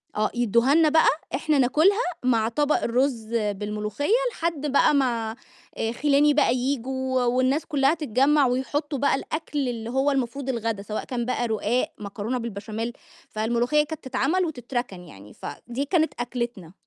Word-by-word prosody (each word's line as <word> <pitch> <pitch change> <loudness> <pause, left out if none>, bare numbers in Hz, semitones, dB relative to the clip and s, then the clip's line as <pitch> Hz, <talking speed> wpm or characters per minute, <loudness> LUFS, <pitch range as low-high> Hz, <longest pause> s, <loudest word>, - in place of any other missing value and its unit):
آه، 215 0 +1
يدوها 240 +3 +3
لنا 320 -1 +5
بقى 320 +1 +4 0.3
إحنا 300 +1 +1
ناكلها 315 - +3 0.2
مع 230 -3 +2
طبق 295 +5 +1
الرز 245 -1 0
بالملوخية، 210 +4 -2 0.2
لحد 330 -7 -3
بقى 280 - +4
ما 235 -5 0 0.7
خِلاني 295 0 +4
بقى 280 -4 +3
ييجوا 260 0 -1
والناس 255 +5 +1
كلها 280 -2 +2
تتجمع 290 -1 +2
ويحطوا 275 +3 -2
بقى 280 - +3
الأكل 290 -2 -3
اللي 230 -1 -5
هو 265 +3 +1
المفروض 270 0 -2
الغدا، 230 -4 -2
سواء 210 +1 -4
كان 240 -2 -3
بقى 245 -1 -1
رقاق، 220 +2 0
مكرونة 210 +4 -4
بالبشاميل، 225 0 -5 0.4
فالملوخية 240 +7 +1
كانت 315 +1 -7
تتعمل 275 +8 0
وتتركن 245 - -4
يعني، 105 - -13
فدي 250 +4 -5
كانت 320 0 +1
أكلتنا. 235 -8 -4
255 Hz, 140 wpm, -25 LUFS, 230-285 Hz, 0.7 s, لنا